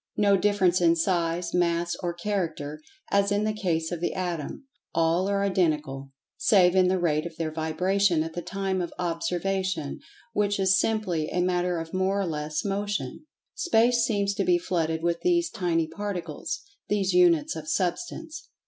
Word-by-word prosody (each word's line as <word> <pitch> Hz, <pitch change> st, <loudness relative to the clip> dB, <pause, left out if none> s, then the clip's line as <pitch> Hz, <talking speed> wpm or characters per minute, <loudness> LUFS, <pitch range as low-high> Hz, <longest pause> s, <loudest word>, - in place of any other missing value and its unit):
No 200 Hz, -1 st, +4 dB
difference 190 Hz, -2 st, +2 dB
in 170 Hz, -1 st, +5 dB
size, 170 Hz, 0 st, 0 dB
mass 170 Hz, -1 st, +1 dB
or[Pg 175 Hz, 0 st, -5 dB
93] 210 Hz, -, 0 dB
character, 155 Hz, -6 st, -3 dB, 0.3 s
as 200 Hz, 0 st, +3 dB
in 205 Hz, +1 st, +1 dB
the 215 Hz, 0 st, 0 dB
case 170 Hz, -6 st, -1 dB
of 175 Hz, -2 st, -4 dB
the 175 Hz, -, -1 dB
Atom—all 175 Hz, -, -2 dB
are 200 Hz, 0 st, +1 dB
identical, 150 Hz, -8 st, 0 dB, 0.3 s
save 185 Hz, -3 st, +4 dB
in 185 Hz, -1 st, +5 dB
the 185 Hz, +1 st, +2 dB
rate 160 Hz, -2 st, 0 dB
of 165 Hz, -, -12 dB
their 160 Hz, -1 st, -2 dB
vibration 165 Hz, +2 st, +1 dB
at 165 Hz, 0 st, -6 dB
the 175 Hz, -, -4 dB
time 195 Hz, 0 st, -2 dB
of 175 Hz, -, -4 dB
observation, 175 Hz, -1 st, -2 dB, 0.3 s
which 205 Hz, -1 st, +1 dB
is 190 Hz, 0 st, +4 dB
simply 190 Hz, -8 st, 0 dB
a 180 Hz, -, -1 dB
matter 180 Hz, 0 st, +1 dB
of 165 Hz, 0 st, -6 dB
more 190 Hz, +2 st, +1 dB
or 195 Hz, -, 0 dB
less 150 Hz, -1 st, -3 dB
Motion. 200 Hz, -, -3 dB, 0.3 s
Space 240 Hz, -7 st, +3 dB
seems 200 Hz, -3 st, +1 dB
to -, -, -1 dB
be 355 Hz, 0 st, +4 dB
flooded 165 Hz, -, -1 dB
with 170 Hz, 0 st, 0 dB
these 345 Hz, -1 st, +2 dB
tiny 165 Hz, -3 st, 0 dB
particles—these 195 Hz, +3 st, -4 dB
Units 175 Hz, -4 st, +4 dB
of 155 Hz, -1 st, -7 dB
Substance. 310 Hz, -, -3 dB
180 Hz, 165 wpm, -26 LUFS, 165-200 Hz, 0.3 s, in